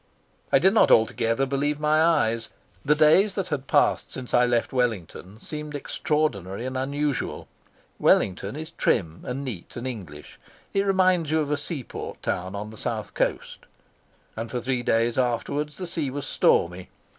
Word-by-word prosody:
I - - +6
did 190 +3 +4
not 220 - +5
altogether 115 +3 +3
believe 145 +2 -1
my 155 +1 +3
eyes. 115 -9 +2 0.3
The 150 +1 +3
days 160 +7 +5
that 195 -3 -2
had 140 -3 -3
passed - - +2
since 130 -2 -7
I 125 0 +5
left 120 +1 0
Wellington 110 -5 -2
seemed 150 +3 -6
extraordinary 130 - -1
and 130 0 -4
unusual. 140 +1 -2 0.5
Wellington 100 +4 +2
is 160 +2 -7
trim 85 - 0
and 135 +3 -3
neat 105 -10 -7
and 120 - -5
English; 95 -13 -8 0.3
it 200 0 +1
reminds 185 -4 +3
you 160 +1 +2
of 150 -1 -1
a - - +3
seaport 145 -2 -6
town 95 +2 -2
on 105 +2 -5
the 110 - -12
South - - -4
Coast. - - -2 0.7
And 115 +1 -5
for 125 - -2
three 125 +1 -1
days 115 +1 +1
afterwards 140 +4 -1
the 185 - -4
sea 165 -5 -2
was 140 +1 -5
stormy. 90 +2 +1
130 Hz, 165 wpm, -25 LUFS, 115-150 Hz, 0.7 s, I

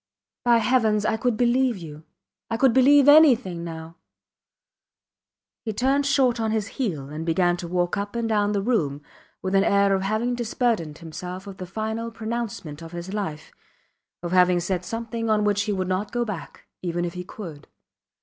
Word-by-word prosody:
By 240 -1 +5
Heavens 220 -3 +2
I 220 - +2
could 235 0 0
believe 245 0 +2
you 155 -4 -9 0.5
I 225 - -1
could 260 -1 +4
believe 275 +2 +6
anything 255 - +6
now! 165 0 -8 1.7
He 220 - -3
turned 270 +5 +1
short 265 -4 +2
on 220 -1 0
his 215 -2 -1
heel 165 - -3
and 155 +2 -5
began 175 +1 +2
to 175 - -6
walk 175 +1 0
up 205 +2 -4
and 235 -1 -1
down 210 -1 +1
the 200 -1 0
room 150 - 0 0.4
with 190 0 -2
an 195 0 +4
air 200 0 +3
of 190 - +1
having 215 +5 0
disburdened 225 - -1
himself 180 +3 -7
of 195 -1 -9
the 185 - -7
final 220 +4 -3
pronouncement 225 -8 -5
of 165 +1 -10
his 175 +3 -6
life 190 -8 -4 0.7
of 175 - -4
having 180 -1 +4
said 180 0 -2
something 230 +2 -4
on 215 -1 +3
which 205 -1 +2
he 215 - -1
would 190 -2 -1
not 185 +3 -2
go 240 -1 -1
back, 205 -7 -7 0.2
even 175 -1 -2
if 170 - -4
he 180 -1 -6
could. 170 -6 -9
205 Hz, 180 wpm, -24 LUFS, 175-230 Hz, 1.7 s, believe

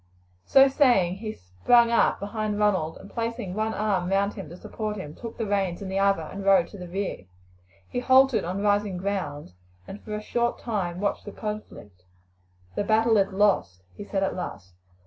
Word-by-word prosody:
So 270 0 +7
saying 240 - +3
he 215 +1 -5
sprang 155 - +2
up 235 - +3
behind 210 0 -3
Ronald, 190 -7 +1
and 195 - -12
placing 230 -3 -4
one 220 +2 -1
arm 195 -4 0
round 200 +1 +1
him 150 - -8
to 175 - -10
support 215 +2 -5
him, 150 -6 -7
took 230 +4 -9
the 225 - -2
reins 195 -4 -1
in 195 - -6
the 190 +1 -1
other 195 -4 +2
and 195 +5 -7
rode 195 -3 +4
to 205 - -11
the 180 - -7
rear. 190 - -4 0.6
He - - -3
halted 260 -3 +4
on 185 +4 -3
rising 205 -2 +1
ground, 175 - -4 0.3
and 205 - -9
for 210 - -6
a - - -3
short 240 +2 0
time 185 -7 -3
watched 200 - -1
the 205 - -7
conflict. 205 - -8 0.7
"The - - -1
battle 225 +2 +3
is 195 0 +2
lost," 190 - +1
he - - -7
said 195 -1 -2
at 190 - -1
last. 95 - -7
200 Hz, 190 wpm, -26 LUFS, 180-215 Hz, 0.7 s, So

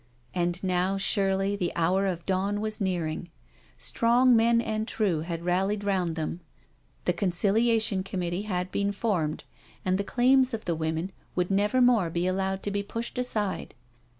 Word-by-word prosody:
And 175 0 -1
now 185 +1 +1
surely 195 0 +1
the 180 -4 -1
hour 185 +4 +2
of 175 -3 -3
dawn 195 +2 0
was 215 0 -2
nearing. 175 -3 -2 0.5
Strong 245 +2 +3
men 230 +1 +4
and 220 -1 -2
true 200 -9 0
had 165 +1 -5
rallied 195 +3 +1
round 185 -5 0
them. 165 +1 -3 0.7
The 180 - +2
Conciliation 205 +3 +1
Conmiittee 180 0 -3
had 180 -2 -2
been 200 0 0
formed, 185 -8 -1 0.4
and 185 +1 +1
the - - +1
claims 255 +2 +3
of 220 - -9
the 170 - 0
women 160 +3 -2 0.2
would 180 +1 0
never 205 +6 +2
more 235 -8 +4
be 170 +2 -1
allowed 190 +1 -1
to 205 - -2
be 200 0 -1
pushed 230 +4 -5
aside. 215 -6 -2
195 Hz, 160 wpm, -27 LUFS, 180-215 Hz, 0.7 s, men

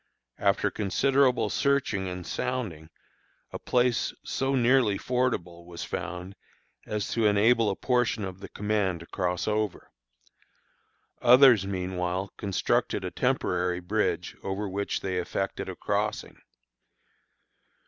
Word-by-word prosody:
After - - +2
considerable 130 +2 +2
searching 140 -9 +1
and 90 -1 -6
sounding, 85 -4 -3 0.6
a - - -4
place 125 -1 +1
so 135 +1 -1
nearly 120 -4 +3
fordable 90 -10 -2
was 85 -1 -7
found 90 +2 -5 0.5
as 105 -2 -2
to 115 -2 +2
enable 110 +2 +4
a 100 - -1
portion 120 -4 0
of 95 0 -7
the - - -9
command 105 -4 -1
to - - -10
cross 90 -1 -2
over. 105 -2 -2 1.3
Others 125 -5 +7
meanwhile 90 0 -3
constructed 100 -3 0
a - - -4
temporary 90 0 0
bridge 90 -1 -1
over 100 +2 -3
which 100 +1 -2
they 95 -1 -2
effected 95 +2 -3
a - - -5
crossing. - - -2
100 Hz, 115 wpm, -27 LUFS, 90-120 Hz, 1.3 s, Others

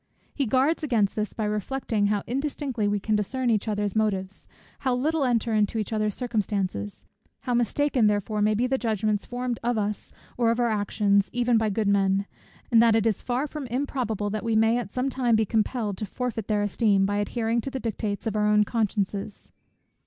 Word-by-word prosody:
He 275 -4 -1
guards 270 +8 +2
against 230 -9 +1
this 215 -1 -2
by 220 - -3
reflecting 210 0 -1
how 205 -1 0
indistinctly 265 -3 -2
we 205 0 +1
can 215 +2 0
discern 245 +4 0
each 215 0 0
other's 205 -1 -1
motives, 195 -3 -1 0.3
how 260 -2 0
little 300 +4 0
enter 235 -3 +1
into 210 +1 +1
each 215 0 -2
other's 215 -1 0
circumstances, 200 - -2 0.4
how 245 - -2
mistaken 240 0 +2
therefore 210 +1 0
may 210 +1 +3
be 235 +4 +1
the 265 +1 0
judgments 215 -2 -1
formed 245 -1 -3
of 240 0 0
us, 210 0 -3 0.3
or 235 -1 +3
of 230 +1 +1
our 240 -1 +2
actions, 205 -1 +1
even 245 0 +2
by 220 -1 +2
good 210 +1 -1
men, 195 0 +2 0.5
and 230 -1 +6
that 230 -1 +5
it 225 -1 +2
is 220 -4 +1
far 250 +3 -1
from 295 -2 -6
improbable, 240 -5 -2
that 215 0 -3
we 230 -1 0
may 225 +2 +4
at 210 -5 -6
some 260 +2 -1
time 245 -3 +2
be 220 0 +2
compelled 215 -1 -1
to 215 - -3
forfeit 230 -2 -4
their 210 -1 +1
esteem, 205 -1 +2
by 205 +1 0
adhering 225 +2 0
to 270 - -4
the 265 - -4
dictates 215 -3 -3
of 220 -1 -2
our 210 0 +2
own 210 0 +5
consciences. 205 -2 -2
220 Hz, 200 wpm, -26 LUFS, 205-245 Hz, 0.5 s, and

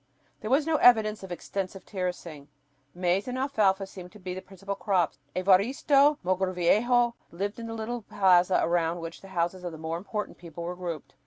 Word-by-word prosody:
There 215 - -5
was 280 +4 +3
no 320 -1 +2
evidence 220 -5 +5
of 190 -2 -9
extensive 190 +1 -5
terracing. 180 -6 -5 0.5
Maize 180 +3 0
and 250 0 -3
alfalfa 210 -8 +1
seemed 185 -2 -11
to 210 - -13
be 185 -1 -5
the 185 - -6
principal 195 +1 -6
crops. 190 -6 0 0.2
Evaristo 265 - +4
Mogrovejo 190 +7 +2 0.2
lived 200 +6 -4
on 230 - -6
the 225 - -5
little 230 +2 -4
plaza 185 -3 +3
around 170 0 +1
which 165 0 -7
the 195 - -12
houses 180 0 -2
of 175 - -4
the 160 - -9
more 160 +1 -3
important 210 +3 -5
people 170 -1 -8
were 175 +1 -4
grouped. 165 -7 -6
190 Hz, 180 wpm, -28 LUFS, 175-215 Hz, 0.5 s, evidence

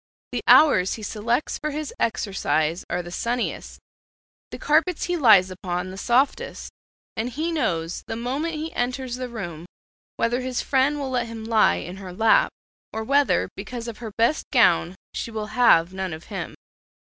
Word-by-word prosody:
The - - -2
hours 190 -12 +6
he 220 - -9
selects 230 +6 -1
for 305 - -2
his 300 0 -5
exercise 180 -7 0
are 180 - -2
the 175 - -9
sunniest; 235 +6 -3 0.7
the - - -7
carpets 320 +3 +1
he 355 - -1
lies 210 - +6
upon 180 0 -4
the - - -8
softest, 250 +7 0 0.4
and 225 +3 -2
he 310 +7 -2
knows 170 - -1
the 225 - -4
moment 275 +8 -2
he 315 +2 -5
enters 250 0 -2
the 255 -1 -5
room 175 -8 -7 0.5
whether 240 +2 0
his 255 -1 -2
friend 275 +2 +2
will 275 -2 -4
let 245 -2 0
him 225 -1 -7
lie 220 - +4
in 175 - -6
her 190 -2 -8
lap, 220 +4 +4 0.4
or 220 - -4
whether 280 +4 +2
because 240 -2 -6
of 230 -2 -7
her 225 -3 -6
best 235 +7 +2
gown 180 - +4 0.2
she - - -4
will 215 -1 -5
have 185 -8 +5
none 190 -2 -3
of 160 +1 -8
him. - - -5
230 Hz, 170 wpm, -24 LUFS, 190-265 Hz, 0.7 s, hours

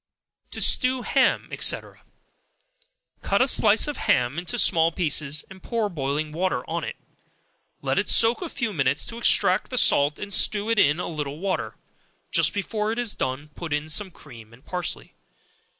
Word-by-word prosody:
To - - -6
Stew 255 0 +1
Ham, - - +1
&c. - - +2 1.4
Cut 200 - 0
a - - 0
slice 215 -2 +5
of 295 - -4
ham 125 +6 +1
into 175 -1 -5
small 165 0 +3
pieces, 150 -4 -1
and 190 -1 -14
pour 225 -1 -2
boiling 150 -2 -3
water 185 +4 -2
on - - -3
it; - - -5 0.9
let - - 0
it - - -2
soak 230 +6 +4
a 350 - -5
few 235 -8 -3
minutes 140 -3 +1
to 230 - -6
extract 190 -5 +3
the 255 - -4
salt, 145 -8 +4
and 205 -1 -5
stew 210 +3 +1
it 230 - +2
in 150 0 +3
a - - -3
little 150 -3 -5
water; 190 +2 -3 0.6
just - - +3
before 210 +2 -3
it 225 - -4
is 240 -3 -1
done, 130 +3 -4
put 170 -3 -8
in 150 +1 -2
some 190 +5 -2
cream 115 -9 -14
and 125 +5 -19
parsley. 180 -3 -5
180 Hz, 175 wpm, -24 LUFS, 150-210 Hz, 1.4 s, slice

